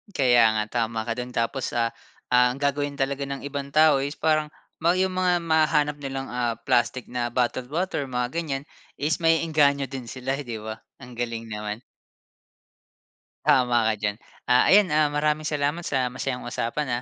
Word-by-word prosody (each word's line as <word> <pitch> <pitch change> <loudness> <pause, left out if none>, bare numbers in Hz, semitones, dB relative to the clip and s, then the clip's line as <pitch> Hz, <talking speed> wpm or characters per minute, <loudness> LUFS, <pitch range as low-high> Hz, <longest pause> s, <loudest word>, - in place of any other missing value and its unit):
Kaya 120 -4 +5
nga 110 - +1 0.2
tama 110 0 -4
ka 115 - -2
dun 125 0 -5
tapos, 115 +3 -2
ah, 115 -1 +1 0.4
ang 125 +2 +3
gagawin 145 0 0
talaga 140 0 -2
ng 140 0 -5
ibang 140 0 -5
tao 155 -2 +6
is 140 +2 -2
parang 155 -1 +1 0.3
ma 170 +2 +4
yung 185 +1 +1
mga 180 -1 +2
mahahanap 155 -2 +2
nilang, 135 -1 -5
ah, 120 -1 -1
plastic 125 +1 0
na 120 -1 -3
bottled 125 0 0
water, 175 -4 -1
mga 125 -2 -2
ganyan 140 -3 -3 0.4
is 150 +3 +1
mae-engganyo 155 -4 +2
din 130 -2 -6
sila 130 +3 -3
'di 120 -6 -6
ba? 110 0 -6 0.2
Ang 125 -2 -11
galing 115 -1 -4
naman. 105 +1 -5 1.6
Tama 120 -3 +4
ka - - 0
diyan. 105 -1 -1 0.3
Ah, 125 0 +5
ayan, 205 -1 +7
ah, 150 -1 +2
maraming 150 +1 0
salamat 150 +2 -1
sa 130 -4 0
masayang 125 0 -4
usapan, 120 +4 -2
135 Hz, 165 wpm, -25 LUFS, 120-150 Hz, 1.6 s, ayan